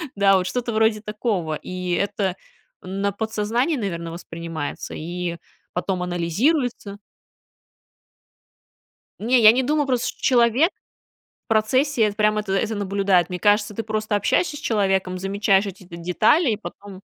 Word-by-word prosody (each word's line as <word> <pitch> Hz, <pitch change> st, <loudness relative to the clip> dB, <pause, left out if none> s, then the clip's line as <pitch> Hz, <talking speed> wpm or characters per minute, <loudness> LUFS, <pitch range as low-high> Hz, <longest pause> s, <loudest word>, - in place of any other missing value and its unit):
да, 195 Hz, -1 st, +5 dB
вот 185 Hz, 0 st, -1 dB
что-то 240 Hz, +3 st, -2 dB
вроде 220 Hz, -1 st, +2 dB
такого, 210 Hz, -7 st, -2 dB
и 180 Hz, +2 st, -5 dB
это 200 Hz, -1 st, -1 dB, 0.5 s
на 195 Hz, +2 st, -2 dB
подсознании, 220 Hz, -, -1 dB
наверное, 170 Hz, -7 st, -4 dB
воспринимается 165 Hz, -3 st, -6 dB
и 170 Hz, +1 st, -4 dB, 0.4 s
потом 180 Hz, 0 st, -2 dB
анализируется. 200 Hz, -, -1 dB, 2.2 s
Не, 240 Hz, +4 st, +3 dB
я 215 Hz, 0 st, +9 dB
не 255 Hz, +2 st, +1 dB
думаю, 295 Hz, +1 st, +1 dB
просто 250 Hz, -1 st, 0 dB
человек 250 Hz, -, +4 dB, 0.7 s
в -, -, -68 dB
процессе 240 Hz, +4 st, +2 dB
это 205 Hz, -1 st, +1 dB
прям 215 Hz, 0 st, +2 dB
это 200 Hz, -2 st, -3 dB
это 220 Hz, +2 st, 0 dB
наблюдает. 195 Hz, -3 st, +1 dB
Мне 180 Hz, -1 st, -4 dB
кажется, 210 Hz, 0 st, +2 dB
ты 225 Hz, -, -3 dB
просто 215 Hz, -1 st, -2 dB
общаешься 295 Hz, -, +1 dB
с -, -, -8 dB
человеком, 190 Hz, -6 st, 0 dB
замечаешь 195 Hz, +1 st, +2 dB
эти 190 Hz, 0 st, -9 dB
детали 180 Hz, -, +2 dB
и 210 Hz, -, -1 dB
потом 200 Hz, -2 st, -10 dB
205 Hz, 135 wpm, -22 LUFS, 185-225 Hz, 2.2 s, я